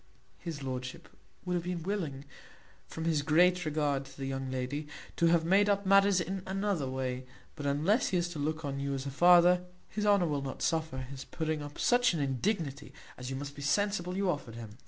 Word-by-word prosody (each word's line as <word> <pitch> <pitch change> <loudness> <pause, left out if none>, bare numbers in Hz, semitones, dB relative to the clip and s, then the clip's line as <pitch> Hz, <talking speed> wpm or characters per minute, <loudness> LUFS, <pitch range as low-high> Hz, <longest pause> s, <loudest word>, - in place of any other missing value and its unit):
His 160 -5 -6
lordship 130 +5 -5 0.4
would 180 - -1
have 175 -1 -1
been 175 -2 -3
willing, 160 -8 -3 0.6
from 160 - -5
his 160 -3 +2
great 175 +4 +4
regard 145 -3 0
to 135 - -14
the 135 - -4
young 135 0 -3
lady, 130 +4 -3 0.3
to 170 - +4
have 165 -1 +3
made 200 +4 +4
up 200 0 +1
matters 195 0 +5
in 185 +3 -3
another 190 -7 -1
way; 130 -1 -3 0.3
but 145 -2 -4
unless 160 - +2
he 185 - +1
is 175 0 0
to 165 -4 -6
look 155 +2 -2
on 140 -1 -3
you 140 0 -2
as 135 0 -4
a 140 - -3
father, 175 +3 +6 0.3
his 210 -1 -2
honour 200 -3 +5
will 145 -3 -1
not 135 -1 -5
suffer 160 -4 0
his 130 +1 -6
putting 160 0 -2
up 145 0 -8
such 245 -6 +3
an - - -2
indignity 145 - -2 0.2
as 125 0 -7
you 135 - -3
must 140 +1 -6
be 145 - -8
sensible 185 +3 0
you 195 0 +1
offered 145 -9 -2
him." 115 0 -9
155 Hz, 210 wpm, -31 LUFS, 140-180 Hz, 0.6 s, father